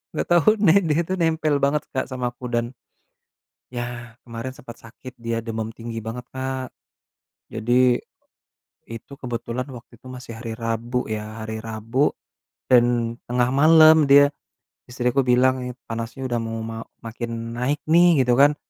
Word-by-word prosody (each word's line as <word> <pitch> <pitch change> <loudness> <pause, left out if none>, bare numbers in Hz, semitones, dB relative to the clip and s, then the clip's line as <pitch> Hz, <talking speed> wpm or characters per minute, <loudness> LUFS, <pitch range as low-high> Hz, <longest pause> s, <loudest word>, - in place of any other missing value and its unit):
nggak - - -2
tau 175 -3 +4
nih, 200 -1 +5
dia 155 -1 +1
itu 185 - -3
nempel 160 -3 +1
banget 145 +2 +2
Kak 130 - -1
sama 125 -1 -2
aku, 125 -1 -7
dan, 120 +1 -1 1.0
ya, 120 -1 -6
kemaren 115 +2 -6
sempet 120 -3 -12
sakit, 125 +3 -12
dia 115 0 -2
demam 110 -1 -4
tinggi 115 0 -6
banget 115 +3 -6
Kak. 130 -1 -4 0.8
Jadi, 125 +1 +2 0.9
itu 115 +4 -9
kebetulan 120 0 -4
waktu 120 -1 -12
itu - - -19
masih 125 -3 -9
hari 115 -2 -5
Rabu 115 +2 -2
ya, 110 +1 -5
hari 110 0 -5
Rabu 115 +5 0 0.6
dan 120 -2 +3
tengah 125 0 +1
malem 155 +2 +7
dia, 145 0 +7 0.6
istri 125 0 -1
aku 135 - +3
bilang 130 +1 +3
nih, 125 0 -5
panasnya 115 +4 -5
udah 120 -1 0
mau 115 0 -4
ma 115 0 -6 0.2
makin 115 0 -5
naik 140 +4 -1
nih 170 -3 +5
gitu 125 - +3
kan. 145 +1 +6
125 Hz, 155 wpm, -23 LUFS, 115-135 Hz, 1.0 s, malem